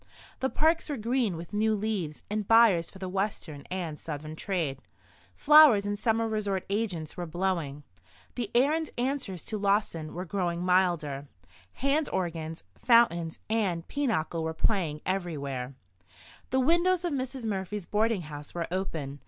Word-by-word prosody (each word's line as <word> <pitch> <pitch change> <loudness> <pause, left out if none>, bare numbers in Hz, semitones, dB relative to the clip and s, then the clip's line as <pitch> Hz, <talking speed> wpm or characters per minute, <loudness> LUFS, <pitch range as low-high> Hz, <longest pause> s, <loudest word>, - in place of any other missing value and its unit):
The 265 - 0
parks 320 +3 +2
were 290 - -2
green 230 -4 0
with 170 +4 -9
new 215 +1 +2
leaves 200 -8 -3
and 210 -1 -2
buyers 225 -8 +5
for - - -13
the 190 -1 -5
Western 185 -6 -3
and 170 -5 -4
Southern 155 0 -6
trade. 160 -7 -2 0.6
Flowers 295 -9 +7
and 205 - -1
summer 225 0 +1
resort 205 -3 -1
agents 195 -7 -2
were 175 -1 -4
blowing; 165 -5 -2 0.5
the 235 -4 -3
air 270 +5 +5
and 320 -1 -1
answers 245 - -2
to 215 - -4
Lawson 195 -6 0
were 180 +2 -4
growing 175 -2 -1
milder; 170 -6 +1 0.5
hand 280 +3 +1
organs, 165 -3 -3 0.2
fountains 175 -9 +4
and 195 -7 0
pinochle 220 - -1
were 160 0 -3
playing 160 -5 0
everywhere. 140 -9 -3 0.7
The 260 - +2
windows 345 +6 +3
of 340 - -1
Mrs. 260 -2 -3
Murphy's 200 -2 -3
boarding 215 0 +1
house 150 -1 -9
were 170 -1 -1
open. 160 -7 -3
190 Hz, 150 wpm, -29 LUFS, 165-230 Hz, 0.7 s, Flowers